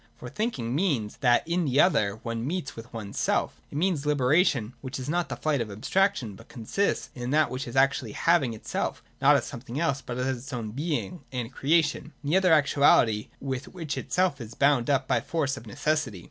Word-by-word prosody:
For 125 - -9
thinking 125 - -2
means 140 - 0
that, 125 0 +3
in 170 +1 +1
the 135 0 +1
other, 105 - +3
one 115 -1 -3
meets 160 -4 -3
with 115 +1 -10
one's 105 -3 -6
self. - - 0
— - - -35
It - - -5
means 170 -3 +1
a - - -5
liberation, 140 - +2
which 135 0 -5
is 130 - -6
not 175 +3 0
the 120 - -3
flight 140 +2 0
of 110 - -3
ab 100 +2 -9
straction, 195 - +1
but 115 +4 -15
consists 150 - -2
in 125 -4 -5
that 150 +2 +3
which 130 +1 -4
is 120 - -7
actual 135 -4 +2
having 140 -4 +2
itself 110 - -3 0.2
not - - +6
as - - +1
something 120 +2 -6
else, 140 -5 0
but 125 -2 -6
as 130 0 -1
its 135 +4 -9
own 115 -3 -4
being 155 +6 -3
and 125 -1 -4
creation, 155 +2 +1
in 145 - -2
the 180 - +5
other 185 -2 +3
actuality 140 -8 +4
with 135 0 -4
which 165 -6 -5
it - - -7
is 140 -12 0
bound 140 -3 +3
up 135 -2 +2
by - - +2
the - - -13
force 145 -5 0
of 115 - -11
necessity. 140 - -1
135 Hz, 220 wpm, -27 LUFS, 120-155 Hz, 0.2 s, not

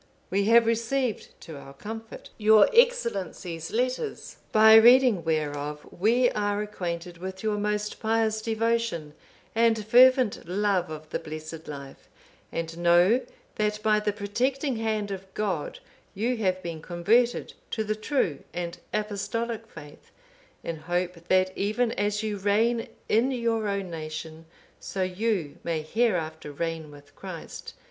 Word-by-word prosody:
_ - - -31 0.3
We 200 +1 +2
have 230 +1 +6
received 230 +1 -1
to 160 -3 -9
our 135 0 -12
comfort 225 +7 -8
your 215 0 +6
Excellency's 200 - +1
letters; 255 - -2
by 220 0 +7
reading 235 -3 +7
whereof 150 -2 -2
we 235 +6 +3
are 205 -1 -1
acquainted 175 -4 -5
with 190 +2 -7
your 210 -1 0
most 210 0 -2
pious 220 -1 +1
devotion 225 -8 -1 0.4
and 225 -2 +2
fervent 250 -3 +5
love 195 -1 0
of 155 0 -8
the - - -1
blessed 155 +1 -8
life; 140 -2 -9 0.4
and 165 0 -4
know 175 +8 +5 0.4
that 210 0 0
by 215 -1 +4
the 210 0 0
protecting 245 +6 -1
hand 215 -2 -1
of 190 0 -7
God 190 -8 -2 0.4
you 235 +5 0
have 185 -3 0
been 165 -2 -5
converted 215 +9 +1 0.2
to 220 - -2
the 215 0 -1
true 215 - -1 0.2
and 170 -1 -4
Apostolic 220 +2 -3
faith, 150 -6 -13 0.5
in 165 - -4
hope 175 +1 -3
that 185 0 +2
even 220 +4 0
as 210 0 -1
you 210 -1 -2
reign 220 +4 +1 0.2
in 230 +5 +3
your 230 -4 0
own 200 -3 -2
nation, 160 0 -7 0.3
so 190 -2 -3
you 185 -5 -2
may 160 -2 -2
hereafter 160 -6 -1
reign 165 +1 -4
with 145 -1 -16
Christ. - - -8
205 Hz, 140 wpm, -27 LUFS, 170-225 Hz, 0.5 s, by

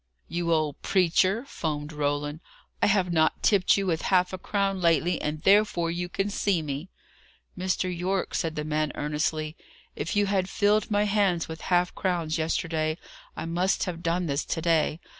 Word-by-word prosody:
"You 170 0 -2
old 155 -3 0
preacher!" 190 +5 +2
foamed 150 - -4
Roland. 145 +1 -2 0.4
"I - - +4
have 190 -4 +2
not 160 -1 +2
tipped 200 -3 +4
you 200 - 0
with 165 -3 0
half 180 -1 +2
a 185 - -4
crown 195 -1 -1
lately, 170 +1 +2
and 150 +1 -3
therefore 195 -4 +3
you 175 +1 -3
can 195 +3 -2
see 195 -5 +1
me!" 145 +4 -5 0.7
"Mr. 185 0 -1
Yorke," 185 +2 -1
said 160 -2 -1
the 150 - -2
man, 155 0 -1
earnestly, 155 +1 -2 0.4
"if 160 +7 -3
you 205 0 +3
had 195 -1 0
filled 210 +2 +2
my 205 -1 +2
hands 200 -5 +1
with 160 0 -8
half 180 0 +2
crowns 170 -5 -1
yesterday, 160 0 -1 0.4
I - - -4
must 175 +3 0
have 170 -3 -4
done 175 +1 0
this 140 -2 -1
to - - -2
day. 165 -1 +1
170 Hz, 175 wpm, -27 LUFS, 155-190 Hz, 0.7 s, I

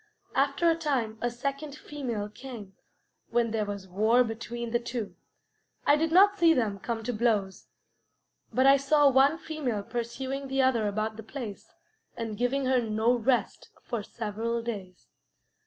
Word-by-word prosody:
After 280 +5 +2
a 330 - +5
time 260 -9 -1
a 240 - +1
second 275 +4 -4
female 250 -9 -4
came, 215 -3 -10 0.6
when 230 -1 +1
there 215 -1 0
was 200 -2 -5
war 220 +7 +3
between 235 +1 -5
the 240 - +2
two. 235 -3 -5 0.7
I 290 - +6
did 320 +1 0
not 400 +4 +6
see 330 -1 +6
them 215 -6 0
come 225 +2 -4
to 245 - -2
blows, 210 -4 0 0.8
but 260 - +2
I 275 +1 +7
saw 280 +1 +4
one 275 +4 +4
female 285 -11 -3
pursuing 260 +4 -4
the 270 0 -2
other 235 -5 +2
about 215 +1 -2
the - - -6
place, 220 -2 -8 0.4
and 225 -2 -4
giving 250 +4 0
her 255 -1 +3
no 220 +1 +1
rest 245 +1 0
for 235 -4 -3
several 230 +2 -3
days. 195 -6 -6
240 Hz, 155 wpm, -28 LUFS, 220-275 Hz, 0.8 s, I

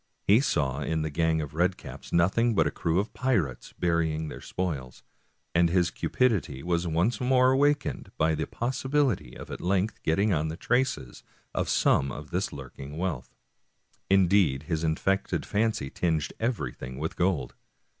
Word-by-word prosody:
He 105 +4 +5
saw 70 - 0
in 80 +2 -1
the 80 - -3
gang 80 +1 +1
of 75 -2 -6
red 90 +3 +1
caps - - -10
nothing 105 +7 +3
but - - +4
a - - 0
crew 85 +1 -1
of 105 - -3
pirates 110 - -1
burying 80 -2 0
their - - -8
spoils, 70 -9 -4 0.5
and 85 0 +4
his 90 0 +2
cupidity 100 - 0
was 85 0 0
once 90 +9 +1
more 130 0 +4
awakened 145 +2 +1
by 80 0 +2
the 80 0 -2
possibility 130 - -1
of - - -9
at - - -6
length 100 +4 0
getting 100 +6 +2
on 80 -1 0
the 80 +1 -5
traces 125 - -1 0.3
of - - -1
some 65 0 +3
of 75 +3 -8
this 90 +3 -1
lurking 70 +1 -9
wealth. 85 -7 -3 0.7
Indeed, 95 -7 +4
his 80 0 -2
infected 95 +5 0
fancy 105 -9 0
tinged 80 -4 -1
everything 110 - -3
with 80 +3 -3
gold. 90 -4 0
85 Hz, 160 wpm, -27 LUFS, 80-105 Hz, 0.7 s, He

